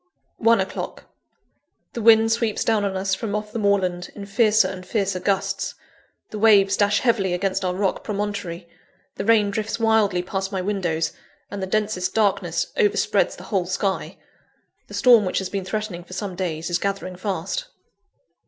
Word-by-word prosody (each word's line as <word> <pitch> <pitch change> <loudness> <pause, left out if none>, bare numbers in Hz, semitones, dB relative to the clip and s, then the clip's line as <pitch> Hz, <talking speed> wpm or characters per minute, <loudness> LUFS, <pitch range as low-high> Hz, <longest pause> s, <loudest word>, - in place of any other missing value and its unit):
(1 230 -1 +4
o'clock.) 190 - -4 0.9
The 235 - -4
wind 225 0 +6
sweeps 225 -2 0
down 220 -2 +1
on 195 -1 -1
us, 195 0 -1
from 205 +1 -2
off 210 0 -4
the 230 - -3
moorland, 185 -4 0
in 200 - -7
fiercer 215 0 +3
and 185 0 -7
fiercer 195 -1 -1
gusts; 195 0 -1 0.6
the 210 - -5
waves 200 -2 +5
dash 205 +1 +2
heavily 195 -7 +1
against 190 +1 -1
our 180 -1 -1
rock 195 0 -1
promontory; 200 -4 -4 0.5
the - - -3
rain 215 -2 +4
drifts 220 +2 -3
wildly 215 -5 +2
past 190 +1 -3
my 190 - -2
windows; 180 -5 -1 0.4
and 200 - -5
the 190 - -2
densest 205 -2 -1
darkness 220 - 0
overspreads 420 -4 +2
the - - -11
whole 185 -3 +1
sky. 190 +1 -2 0.7
The - - -9
storm 240 -4 +6
which 185 - -1
has 190 -1 -2
been 195 -2 -3
threatening 210 -3 -4
for 185 - -12
some 190 -1 -4
days, 170 -2 -3
is 175 - +1
gathering 195 -1 -3
fast. 210 - -3
200 Hz, 170 wpm, -23 LUFS, 185-215 Hz, 0.9 s, wind